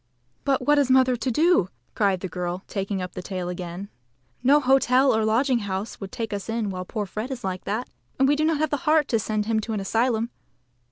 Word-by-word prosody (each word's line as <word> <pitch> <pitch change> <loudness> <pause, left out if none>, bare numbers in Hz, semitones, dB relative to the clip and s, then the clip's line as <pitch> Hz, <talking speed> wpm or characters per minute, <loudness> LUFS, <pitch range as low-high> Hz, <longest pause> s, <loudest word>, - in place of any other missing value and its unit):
"But 270 -2 +1
what 295 0 +4
is 275 -2 +2
mother 260 -1 +5
to 235 +2 -2
do?" 310 - +3 0.2
cried 195 -4 +1
the 190 - -3
girl, 180 +1 -4
taking 195 -1 -3
up 180 - -5
the 185 - -6
tale 180 -2 -4
again. 180 +2 -6 0.5
"No 275 +4 +5
hotel 265 -1 +4
or 220 - +1
lodging 240 +4 +2
house 200 +1 -4
would 195 -1 -6
take 225 -3 -4
us 200 +2 -5
in 225 -3 -1
while 185 -1 -5
poor 210 +2 -3
Fred 215 +6 -5
is 260 -3 -6
like 185 -1 -4
that. 220 +5 -2 0.3
And 270 - +4
we 290 - +4
have 310 +1 +1
not 310 -1 +1
the 290 - +1
heart 310 -1 +2
to 225 - +2
send 215 -1 -1
him 220 0 +1
to 220 +1 -4
an 210 - -1
asylum. 230 +3 0
225 Hz, 225 wpm, -24 LUFS, 195-260 Hz, 0.5 s, mother